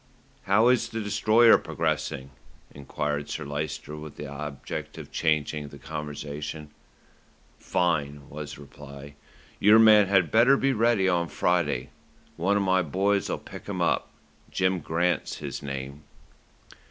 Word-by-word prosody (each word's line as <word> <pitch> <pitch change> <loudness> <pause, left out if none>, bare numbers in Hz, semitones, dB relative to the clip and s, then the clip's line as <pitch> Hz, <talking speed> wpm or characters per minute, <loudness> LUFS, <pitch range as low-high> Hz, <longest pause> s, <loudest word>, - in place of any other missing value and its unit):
"How 110 +5 +4
is 120 -2 +2
the 115 - -4
Destroyer 110 +2 +5
progressing?" 65 +1 -3 0.4
enquired 75 +1 -3
Sir - - -4
Lyster 75 +1 -4
with 75 -1 -9
the 75 - -6
object 70 0 -6
of - - -9
changing 75 -2 0
the 70 - -12
conversation. 75 +1 -6 0.9
"Fine," 75 -5 -1
was 75 0 -7
the - - -13
reply. 70 0 -11 0.5
"Your 105 +2 +7
man 110 -2 +7
had 95 -4 +2
better 125 +5 +5
be 135 0 +1
ready 115 -4 +2
on 85 -2 +1
Friday. 80 -5 0 0.4
One 100 +4 +1
of 100 - +1
my 95 -1 +3
boys'll 100 +5 0
pick - - -11
him - - -4
up, - - +1 0.4
Jim 95 -1 +1
Grant's 85 +3 -1
his - - -6
name." 70 0 -6
80 Hz, 135 wpm, -26 LUFS, 75-100 Hz, 0.9 s, Your